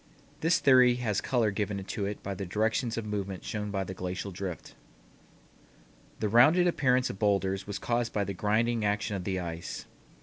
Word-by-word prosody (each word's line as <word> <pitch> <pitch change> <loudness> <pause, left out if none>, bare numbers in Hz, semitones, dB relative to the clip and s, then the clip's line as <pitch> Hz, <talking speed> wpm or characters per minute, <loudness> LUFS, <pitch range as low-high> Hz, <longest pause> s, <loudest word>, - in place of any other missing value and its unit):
This 165 +2 +3
theory 125 -2 +6
has 110 -5 -1
color 120 -6 +1
given 100 -1 -2
to 100 +1 -3
it 105 - -6
by 100 - -3
the 95 - -5
directions 110 +5 0
of 115 - -3
movement 100 -3 -4
shown 105 -1 -4
by 100 -1 -1
the 95 - -6
glacial 90 +2 -4
drift. 90 -2 -6 1.5
The 110 - 0
rounded 140 - +6
appearance 130 -7 +2
of 95 - -11
bowlders 95 -2 +1
was 100 0 -3
caused 120 0 -1
by 105 - 0
the 100 0 -4
grinding 110 +4 +1
action 105 +1 0
of 90 -2 -5
the 95 -2 -1
ice. 85 -1 -5
105 Hz, 180 wpm, -29 LUFS, 95-120 Hz, 1.5 s, theory